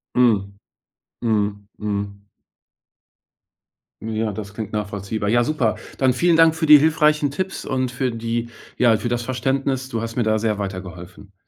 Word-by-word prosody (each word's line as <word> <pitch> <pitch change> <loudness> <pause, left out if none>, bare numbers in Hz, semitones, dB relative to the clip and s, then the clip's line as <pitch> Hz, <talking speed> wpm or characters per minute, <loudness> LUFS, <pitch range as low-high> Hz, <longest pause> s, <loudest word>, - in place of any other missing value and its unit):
Mhm, 105 -6 +3 0.7
mhm, 105 -3 0
mhm. 100 -1 -4 1.8
Ja, 110 0 -2
das 100 -1 -7
klingt 110 0 -6
nachvollziehbar. 105 0 -3
Ja, 120 +3 +3
super. 125 -5 0 0.2
Dann 130 -2 +3
vielen 170 +5 +3
Dank 165 -1 +5
für 160 0 -1
die 150 -1 +9
hilfreichen 150 -1 +3
Tipps 185 +6 -4
und 130 -1 -1
für 125 0 -1
die 115 +1 -3 0.3
ja, 120 -2 +4
für 120 +2 -3
das 120 0 -1
Verständnis. 130 +1 -1
Du 115 -3 -3
hast 115 0 -5
mir 120 - +1
da 110 0 +1
sehr 110 -1 0
weitergeholfen. 95 -1 -7
115 Hz, 150 wpm, -21 LUFS, 105-130 Hz, 1.8 s, die